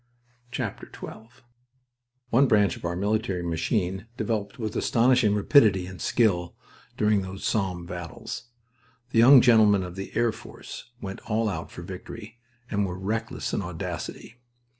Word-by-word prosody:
XII 125 -2 -1 1.6
One 135 +4 +5
branch 105 -4 +3
of - - -13
our 85 0 -2
military 100 -1 -1
machine 90 +4 -1
developed 105 -5 -2
with 110 -3 -4
astonishing 120 -3 +3
rapidity 105 -4 +4
and 90 0 -9
skill 90 -7 +1 0.4
during 105 -1 +3
those 95 +1 -7
Somme 95 -5 -1
battles. 90 +8 -7 0.7
The 115 - +3
young 130 +3 +9
gentlemen 110 -5 +5
of 90 -1 -7
the 95 0 -6
Air 115 0 +3
Force 110 - -10
went 95 -1 -6
"all 110 +1 +1
out" 100 - -4
for - - -9
victory, 115 +3 -9 0.3
and 100 -1 +1
were 90 -2 -3
reckless 110 +4 -3
in - - 0
audacity. 90 +6 -6
105 Hz, 140 wpm, -26 LUFS, 95-115 Hz, 1.6 s, young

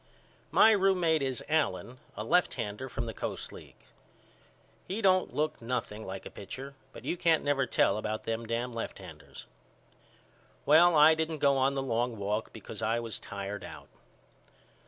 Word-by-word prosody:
My 225 - +6
roommate 185 -6 +3
is 130 -3 -2
Allen 150 -5 -1 0.2
a 105 - -3
lefthander 120 -4 0
from 120 - -4
the 115 - -5
Coast - - -5
League. - - -14 1.0
He 195 +4 -3
don't 185 -3 +2
look 155 -3 -1
nothing 115 -3 -4
like 95 0 -6
a - - -8
pitcher 135 +7 -8 0.2
but - - -12
you - - -1
can't 165 -3 +2
never 135 -3 +1
tell 105 -2 +2
about 110 0 -3
them 115 0 -3
dam 120 +2 -2
left 115 - -5
handers. - - -11 1.2
Well 165 +3 +6
I 155 +1 +8
didn't 160 0 -2
go 140 -1 +3
on 135 +1 +2
the 135 - -1
long 120 -2 -1
walk 105 +2 -2
because - - -9
I 115 +2 +1
was 115 -3 -4
tired 100 0 -6
out. - - -10
130 Hz, 160 wpm, -30 LUFS, 115-160 Hz, 1.2 s, I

